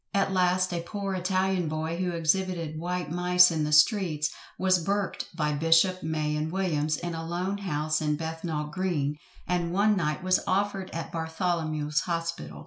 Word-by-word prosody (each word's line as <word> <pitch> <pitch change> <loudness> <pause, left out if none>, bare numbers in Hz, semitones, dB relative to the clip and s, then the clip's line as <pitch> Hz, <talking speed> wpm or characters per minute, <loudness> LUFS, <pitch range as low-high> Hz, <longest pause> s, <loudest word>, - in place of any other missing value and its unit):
At 195 -1 +2
last 185 0 +2
a 170 - -1
poor 195 +3 -4
Italian 185 -1 0
boy 160 +2 -3
who 180 0 -1
exhibited 170 -1 -1
white 175 -2 -3
mice 180 +1 +5
in 155 -2 0
the 150 - -2
streets, 155 -2 +3 0.3
was 185 -2 +2
burked 200 +1 -1
by 150 -3 0
Bishop, 165 +5 +3
May, 155 -1 -1
and 155 +1 -2
Williams, 155 -5 0
in 175 +2 -4
a 165 0 -4
lone 180 +4 -2
house 155 -5 -1
in 150 -1 +1
Bethnal 160 0 -3
green, 150 -5 -1 0.3
and 175 -1 0
one 205 +3 +3
night 155 -1 -1
was 185 0 +3
offered 195 0 0
at 165 -1 -5
Bartholomew's 160 -2 -1
hospital. 165 - -4
170 Hz, 165 wpm, -27 LUFS, 155-185 Hz, 0.3 s, mice